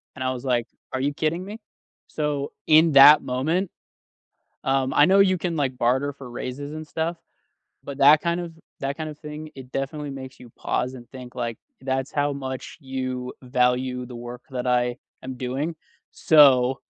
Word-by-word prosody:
And 130 - -5
I 130 - 0
was 125 +1 -7
like, 120 -2 +1 0.3
"Are 130 - -1
you 145 +2 0
kidding 160 +4 -1
me?" 210 +3 -8 0.5
So, 145 -2 -2 0.2
in 160 +1 +6
that 145 +2 +9
moment, 160 +9 -1 0.9
um, 135 0 +1
I 145 - +6
know 195 +1 +5
you 185 -1 +4
can, 170 -1 -2
like, 135 -3 -1
barter 130 +4 +1
for 135 -3 -11
raises 140 +4 -6
and 155 0 -7
stuff, 165 +3 -2 0.7
but 140 0 -7
that 145 +2 +7
kind 170 0 0
of 170 -2 -7 0.3
that 140 0 -2
kind 155 -1 -4
of 150 - -12
thing, 150 0 -8
it 130 -2 -11
definitely 145 +2 -3
makes 130 -1 -9
you 125 - -12
pause 125 +2 -2
and 120 -2 -11
think, 125 -2 -10
like, 115 -2 -4 0.2
"That's 130 0 -2
how 145 0 +1
much 130 +2 -6
you 130 -2 -4
value 125 0 0
the 120 -1 -9
work 120 +1 -8
that 125 -1 -4
I 125 0 +1 0.3
am 130 0 -6
doing. 135 +6 -3 0.4
So, 135 -4 +5
135 Hz, 180 wpm, -24 LUFS, 125-150 Hz, 0.9 s, that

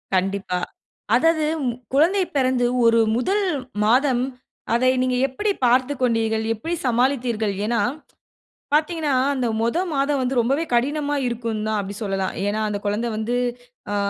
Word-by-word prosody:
கண்டிப்பா. 190 -1 -1 0.6
அதாது 315 +4 +3 0.2
ம் 245 -2 0 0.2
குழந்தை 360 +7 +4
பிறந்து 255 -2 +2 0.2
ஒரு 230 0 +5 0.2
முதல் 395 +11 +1 0.4
மாதம், 250 +2 +3 0.5
அதை 255 +2 +3
நீங்க 255 0 +1
எப்பிடி 405 +11 -1
பார்த்துக் 255 +3 +2
கொண்டீர்கள்? 225 -2 +1
எப்பிடி 325 +11 -4
சமாளித்தீர்கள்? 240 -4 +1
ஏன்னா, 230 0 0 0.9
பாத்தீங்கன்னா, 310 -1 +1 0.2
அந்த 255 -3 -1
மொதொ 235 +10 +1
மாதம் 280 +1 +1
வந்து 255 0 -1
ரொம்பவே 270 +7 +1
கடினமா 290 +4 +1
இருக்குங்தான். 220 -2 -2
அப்டி 200 +1 -6
சொல்லலாம். 195 -2 -2
ஏன்னா 215 +1 -1
அந்த 205 -1 -3
குழந்தை 220 +4 -1
வந்து 230 +3 -1 0.6
ஆ, - - 0
245 Hz, 130 wpm, -22 LUFS, 220-280 Hz, 0.9 s, ஒரு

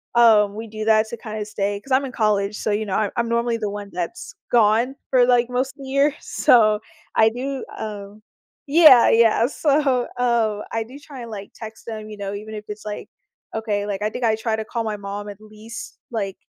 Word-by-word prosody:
um, 215 -4 +5
we 225 +1 -6
do 215 0 -6
that 220 0 +4
to 235 - -6
kinda 215 -1 -5
stay 205 -1 -2
'cause 270 - -14
I'm 265 +2 +3
in 260 - -6
college, 210 -3 0
so, 215 - -2
you 210 +1 0
know, 195 -2 -2
I 210 -2 0
I'm 235 -1 0
normally 235 0 +1
the 215 -2 -2
one 205 0 -6
that's 175 -1 -5 0.2
gone 235 +3 +3 0.2
for, 255 -2 +5
like, 245 -1 +3
most 255 +1 -1
of - - -27
the 265 - -8
year, 280 +2 +2
so, 215 -3 +4 0.4
I 220 - +6
do, 260 +4 -4
um 205 -1 -7 0.5
Yeah, 290 -5 +8
yeah. 230 0 +4
So, 275 -3 +1
um, 230 -4 +1
I 225 - -1
do 260 +4 -11
try 285 -3 -10
and, 230 - -9
like, 200 -2 -8
text 220 -1 -10
them, 215 -2 -6
you 215 - -7
know, 200 -1 -4
even 215 +2 -7
if 210 0 -7
it's 210 0 -7
like 210 -1 -6 0.5
okay, 210 -2 -1
like, 205 -1 -3
I 210 - +1
think 245 - -6
I 220 -1 +3
try 220 0 -1
to 220 - -3
call 230 +1 -3
my 215 - -2
mom 200 +1 -6
at 205 0 -10
least, 215 +2 -10
like, 200 -4 -3
220 Hz, 220 wpm, -22 LUFS, 210-240 Hz, 0.5 s, Yeah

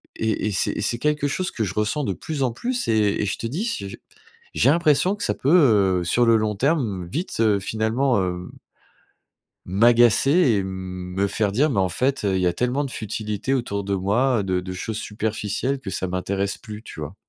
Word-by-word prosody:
et 110 -1 -1
et - - -1
c'est 95 - +1
et - - -4
c'est 120 +2 0
quelque 150 0 0
chose 185 +6 -2
que 110 - -2
je 95 - -3
ressens 105 +7 0
de 95 - -1
plus 155 - -5
en 125 - +1
plus 245 - -2
et 105 -3 +2
et - - 0
je - - -2
te - - -6
dis 145 - -3
s 230 - -3
je - - -8 0.6
j'ai 125 - +3
l'impression 170 +4 +3
que - - -8
ça - - 0
peut, 110 - +4
heu, - - -3
sur 120 +8 +2
le 115 0 +5
long 105 -2 0
terme, 115 - 0
vite, 165 - -4
heu, 105 -3 +3
finalement 110 +5 0
hem 90 -1 -4 1.2
m'agacer 120 +6 +4 0.2
et 100 -2 +1
me 95 0 -4
faire 105 0 0
dire: 140 +9 +2
«Mais 115 -9 0
en 95 - +2
fait, 130 +9 -1
heu, 100 - +1
il 95 - 0
y 90 - +2
a 90 - +1
tellement 125 +8 0
de 140 - -4
futilité 110 +1 -3
autour 110 -6 -2
de 100 0 -2
moi, 110 +7 +1
heu, 100 - -1
de 95 -1 0
de 95 0 -6
choses 105 +4 -4
superficielles 110 +5 -2
que 100 - -7
ça 95 - -2
m'intéresse 95 +2 -2
plus». 105 -1 -9
Tu - - -10
vois? 75 +5 -6
110 Hz, 220 wpm, -23 LUFS, 95-130 Hz, 1.2 s, le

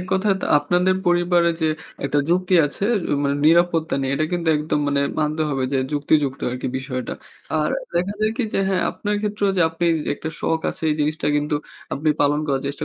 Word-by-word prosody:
১ 180 - -6
কথায় 195 +1 +2 0.2
আপনাদের 180 +5 +2
পরিবারে 175 0 +3
যে 160 - +2 0.4
একটা 145 +1 +1
যুক্তি 185 +1 +2
আছে; 145 - -5 0.3
এ - - +1
মানে, 140 0 +1
নিরাপত্তা 165 -1 +3
নেই। 135 - -1
এটা 155 - 0
কিন্তু 170 -2 -1
একদম 150 0 -1
মানে 140 0 +1 0.2
মানতে 155 +1 0
হবে 135 -2 -1
যে, 135 - +2
যুক্তিযুক্ত 145 -2 +1
আরকি 125 +1 -4
বিষয়টা। 130 -2 -4 0.5
আর 150 - 0 0.2
দেখা 180 +4 0
যায় 215 0 +2
কি 255 - 0
যে, - - +2
হ্যাঁ 190 -1 +1
আপনার 210 0 -3
ক্ষেত্রেও 205 -1 0
যে 180 - +4
আপনি 165 +2 -3 0.3
একটা 160 - -6
শখ 160 0 0
আছে, - - -12
এই - - +2
জিনিসটা 155 +1 -1
কিন্তু 150 0 0 0.4
আপনি 155 +3 -1
পালন 145 +1 +2
করার 135 -2 0
চেষ্টা 140 +1 -4
160 Hz, 195 wpm, -22 LUFS, 145-175 Hz, 0.5 s, যে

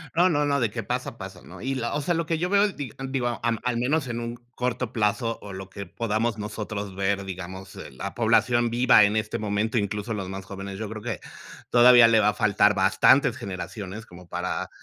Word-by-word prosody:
No, 175 +2 +5
no, 150 -3 +1
no, 140 -1 +1
de 115 -5 0
que - - -4
pasa, - - -4
pasa, - - -9
¿no? - - -12
Y 135 +2 -2
la 120 -2 -2
o 150 - -1
sea, 175 +5 0
lo 165 0 -1
que 165 +1 -1
yo 180 +2 -1
veo 200 +1 +4
es 205 -3 0
digo, 135 -6 -6 0.5
al 115 -1 0
al 125 -1 0
menos 135 +4 0
en 120 -1 -3
un 115 0 -4 0.2
corto 125 -1 -2
plazo, 115 +1 0
o 100 -1 -9
lo 95 0 -8
que 100 +1 -7
podamos 115 +1 -1
nosotros 105 -2 -5
ver, 100 0 0
digamos, 95 0 -8 0.2
la 65 - -6
población 120 -1 +3
viva 120 -2 +5
en 105 +1 +2
este 110 0 -1
momento, 105 +2 -1
incluso, 105 +1 -2
los 100 -3 -4
más 95 0 -6
jóvenes, 100 0 -7
yo 110 -2 -4
creo 110 0 -7
que 115 -4 -3 0.5
todavía 120 -1 +8
le 115 -1 +5
va 105 0 +4
a - - -1
faltar 105 -1 +3
bastantes 115 +6 +4
generaciones 100 0 -6
como 90 -2 -14
para 90 +1 -3
110 Hz, 220 wpm, -25 LUFS, 100-125 Hz, 0.5 s, todavía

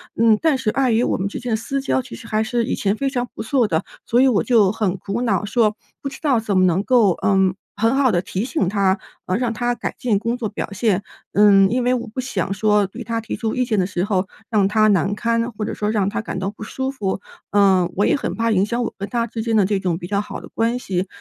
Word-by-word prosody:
嗯， 225 -1 +4
但 315 -5 +3
是 220 - -1
碍 260 0 +1
于 225 +2 +3
我 - - 0
们 195 +1 -1
之 - - -5
间 245 - -5
的 - - +3
私 275 +5 -3
交 265 -1 0
其 255 - -10
实 230 - -11
还 215 0 +1
是 235 +1 0
以 - - -1
前 200 +1 0
非 275 +3 -1
常 245 -2 -2
不 - - -6
错 245 -1 +2
的， 160 -3 0 0.2
所 240 - +2
以 265 - +5
我 215 - +2
就 215 -6 +4
很 205 -4 -1
苦 200 +6 -4
恼 205 -5 +1
说， 215 -1 +2 0.3
不 275 - -4
知 270 - -11
道 275 -7 +2
怎 205 -3 -1
么 185 - +5
能 180 +3 +2
够， 235 -7 +4
嗯， 190 -2 +3 0.2
很 225 +4 +2
好 265 -4 +3
地 175 -2 +1
提 185 +2 -3
醒 260 - -1
她， 195 -1 +1 0.3
呃， 185 +3 +1
让 240 -2 -1
她 240 +2 0
改 - - -4
进 235 -7 +1
工 230 +2 -1
作 225 -4 -3
表 205 - -5
现。 205 -1 +1 0.3
嗯， 200 -2 +6
因 250 0 0
为 250 - +3
我 245 -1 -2
不 225 +4 -7
想 195 -7 -2
说 210 0 +2
对 220 +6 -9
她 230 0 -2
提 225 - -5
出 220 +1 -2
意 255 - +1
见 215 -4 0
的 180 - +1
时 185 -2 -2
候 195 -2 0 0.2
让 205 -4 +3
她 215 +1 +3
难 195 +1 +2
堪， 230 +1 0
或 215 - -5
者 - - -3
说 210 0 -2
让 200 -3 +1
她 220 - -3
感 205 - -5
到 195 +2 -2
不 215 - -10
舒 265 +4 -3
服。 200 -6 -3 0.3
嗯， 190 -3 +4
我 205 - +2
也 - - +3
很 - - -3
怕 230 0 0
影 195 -1 +3
响 235 +2 -1
我 - - -3
跟 200 +1 -4
她 235 -2 0
之 225 -1 -5
间 225 0 0
的 205 -3 +4
这 200 -1 0
种 175 -3 -1
比 175 - -7
较 200 0 0
好 210 - -6
的 - - -11
关 230 +2 0
系。 185 -5 -2
215 Hz, 295 characters per minute, -21 LUFS, 195-240 Hz, 0.3 s, 嗯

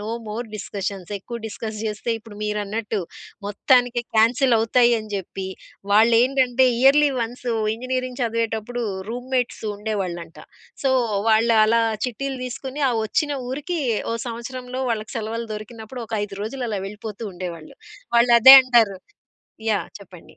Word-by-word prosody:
No 210 - -6 0.2
more 225 +3 -4
discussions. 200 -2 -5
ఎక్కువ 235 +5 -7
discuss 215 0 -6
జేస్తే 215 +2 -3
ఇప్పుడు 215 -2 -13
మీరన్నట్టు, 210 +1 -2 0.5
మొత్తానికే 245 +3 +2
క్యాన్సల్ 240 +3 +4
అవుతాయి 240 +2 +4
అని 215 -1 -9
జెప్పి, 190 0 -5 0.5
వాళ్ళేంటంటే 245 +3 +4
ఇయర్‌లీ 285 +2 +6
వన్సు 240 +1 -3 0.2
ఇంజినీరింగ్ 255 +1 -4
చదివేటప్పుడు, 230 +1 -2 0.3
రూమ్‌మేట్స్ 250 0 -2
ఉండేవాళ్ళంట. 190 -6 -4 0.5
సో, 265 - +3 0.4
వాళ్ళు 225 +1 +4
అలా 230 +1 +3 0.2
చిట్టీలు 265 +2 -4
దీసుకొని 265 +3 -5
ఆ - - 0
ఒచ్చిన 295 +5 0 0.2
ఊరికి, 305 +6 -3 0.3
ఓ - - -1
సంవత్సరంలో 250 +2 -6
వాళ్ళకి 215 -1 -3
సెలవులు 225 +1 -4
దొరికినప్పుడు 220 +3 -8
ఒక - - -5
5 200 - -9
రోజులు 245 +4 -4
అలా 205 - -2
వెళ్ళిపోతూ 210 +1 -8
ఉండేవాళ్ళు. 175 -3 -7 0.4
వాళ్ళదే 240 +2 +9
అంటారు. 230 -7 +3 0.7
యాహ్! 205 - -1
చెప్పండి. 180 -3 -15
230 Hz, 125 wpm, -22 LUFS, 210-250 Hz, 0.7 s, వాళ్ళదే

